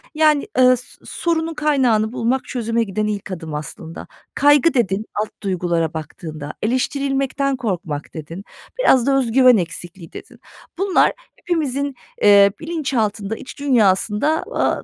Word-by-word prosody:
yani, 305 0 +3
ıııı, 255 0 +6
s 250 - -10 0.2
sorunun 330 -1 -1
kaynağını 255 -8 +1
bulmak, 250 +2 0
çözüme 230 -2 -1
giden 210 0 -2
ilk 205 -2 -4
adım 160 -4 -6
aslında. 155 +2 -7 0.3
"Kaygı" 290 +3 +4
dedin 215 -5 0 0.2
alt 215 - -3
duygulara 175 -4 -1
baktığında. 155 -1 -7
"Eleştirilmekten 270 +3 0
korkmak" 180 - -4
dedin. 165 +4 -8 0.4
Biraz 265 - +4
da 275 -1 +3
"öz 250 -4 0
güven 255 -1 +6
eksikliği" 175 0 -6
dedin. - - -11 0.4
Bunlar 385 0 +3 0.2
hepimizin, 285 -5 -2 0.3
eee, 200 -1 +7
bilinçaltında, 230 -10 -2
iç 260 - -11
dünyasında, 235 +2 +2
aaa, - - 0
230 Hz, 130 wpm, -20 LUFS, 190-275 Hz, 0.4 s, eee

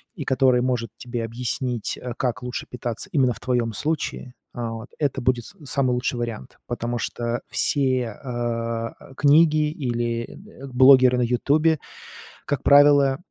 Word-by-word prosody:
и 150 - -6
который 130 -2 +3
может 120 -3 -1
тебе 120 -1 -5
объяснить, 120 0 -3
э, 125 -1 -6
как 125 -1 -2
лучше 125 0 -5
питаться 120 -2 -5
именно 130 -5 +2
в - - -13
твоем 120 -3 -1
случае, 145 -1 -3 0.2
а, 120 -2 -4
вот, 115 +2 -8
это 145 -3 -1
будет 120 -1 0
с - - -13
самый 130 -1 0
лучший 125 0 -2
вариант. 115 - -6
Потому 120 0 -3
что 120 +1 -3
все, 135 -3 +1 0.3
э, 115 -2 -3
э, - - -14
книги 150 +1 +4
или, 120 -5 -2
э, - - -12 0.3
н 135 - -10
блогеры 130 0 +6
на 125 - +2
"Ютубе", 145 +6 +2 0.7
как 145 -3 -2
правило, 140 -1 +5
125 Hz, 160 wpm, -23 LUFS, 120-135 Hz, 0.7 s, блогеры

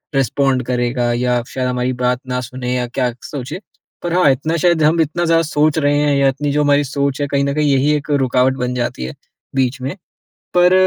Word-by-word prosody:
Respond 135 -1 +1
करेगा, 120 -1 0
या 125 0 +1
शायद 130 -1 -3
हमारी 125 0 -1
बात 125 0 0
ना 125 0 -1
सुने, 125 +1 -4
या 125 -1 0
क्या 125 0 -1
सोचे। 140 +5 -6 0.4
पर 175 -1 -2
हाँ, 180 -4 +4
इतना 155 +5 -1
शायद 170 -1 +2
हम 165 +2 +4
इतना 160 +3 -1
ज़्यादा 165 0 +3
सोच 150 0 +1
रहे 145 -1 +2
हैं, 145 -1 +2
या 140 0 +3
इतनी 140 +2 -1
जो 150 +1 +1
हमारी 145 0 +3
सोच 140 +1 -2
है, 145 - 0
कहीं 140 0 0
न 140 - 0
कहीं 150 0 +1
यही 135 +3 +2
एक 150 +1 -4
रुकावट 130 -2 +2
बन 125 0 -2
जाती 120 - -2
है, 65 - -6 0.4
बीच 130 0 0
में। 135 +7 -4 0.6
पर 180 +1 +5
135 Hz, 215 wpm, -18 LUFS, 125-150 Hz, 0.6 s, पर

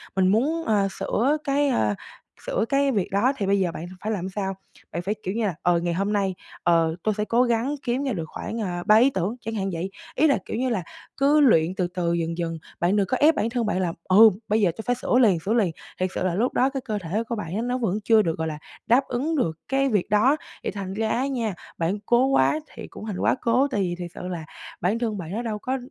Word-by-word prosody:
mình 190 -1 +3
muốn, 280 - +2
ờ, 205 -3 +2
sửa 275 +7 +1
cái, 285 0 +1
ơ, 105 - +1 0.5
sửa 215 - 0
cái 275 0 +2
việc 200 -7 -1
đó 235 +8 +2
thì 200 - -1
bây 200 0 +2
giờ 180 -3 +1
bạn 165 - -6 0.2
phải 215 - -2
làm 190 -3 -2
sao? 195 0 -3 0.4
Bạn 170 - -3
phải, 200 +4 -2
kiểu 185 - -2
như 225 -1 0
là, 185 - -1
ờ, 175 -1 +3
"Ngày 170 0 -1
hôm 200 +4 -1
nay, 195 -3 0 0.3
ờ, 165 -1 +3
tôi 215 - +1
sẽ 210 - 0
cố 235 +3 +3
gắng 240 +4 0
kiếm 250 +3 -1
ra 270 - -1
được 165 -5 -3
khoảng, 225 +8 -5
à, 175 -3 -3
3 215 - +7
ý 250 +5 +6
tưởng", 195 0 -2
chẳng 225 - -5
hạn 195 -2 -1
vậy. 170 +3 -3 0.3
Ý 310 +4 +4
là, 280 - +3
kiểu - - -4
như 255 +1 0
là, 195 -7 -1 0.3
cứ 285 +2 +4
luyện 185 - +4
từ 180 -2 0
từ 175 -1 -1
dần 170 0 -2
dần, 165 -1 -2 0.2
bạn 180 +4 +2
đừng 200 -2 +2
có 255 - 0
ép 310 +2 +5
bản 225 - 0
thân 240 -1 -1
bạn 210 -3 0
là, 175 -3 -1
ừ, 215 +4 +7 0.2
"bây 215 +1 +2
giờ 180 -4 +3
tôi 220 - -5
phải 245 - +1
sửa 245 - +1
liền, 195 -8 +4
sửa 195 +7 -1
liền". 210 -8 +2 0.3
Thiệt 185 0 +1
sự - - -1
là 180 -2 0
lúc 240 +5 +1
đó 260 +2 +3
cái 270 -1 -4
cơ 215 -4 -3
thể 200 +8 -1
của 235 - -1
bạn 180 -4 -5
á 220 - 0
nó 245 +1 -1
vẫn 215 -4 -1
chưa 220 0 +5
được, 165 -4 -1
gọi 160 0 -2
là, 155 -1 -4 0.3
đáp 255 +4 +4
ứng 285 +7 -1
được 165 - -1
cái 275 0 +1
việc 205 -6 0
đó, 245 +9 +4 0.3
thì - - -2
thành 195 -2 -5
ra 220 +2 -1
á 260 +5 0
nha, 235 -6 -2 0.2
bạn 175 +5 -1
cố 240 +3 +4
quá 270 +3 +3
thì 225 - -8
cũng - - -10
thành 205 -4 -4
quá - - +2
cố, 250 +4 +3
tại 205 - 0
vì 175 -2 -1
thiệt 175 -1 -6
sự 180 - -7
là 170 -4 -5 0.4
bản 200 +7 +1
thân 225 -3 -1
bạn 175 -2 -6
nó 220 - -2
đâu 220 -3 -3
có, 260 +4 -2
210 Hz, 270 wpm, -24 LUFS, 180-245 Hz, 0.5 s, 3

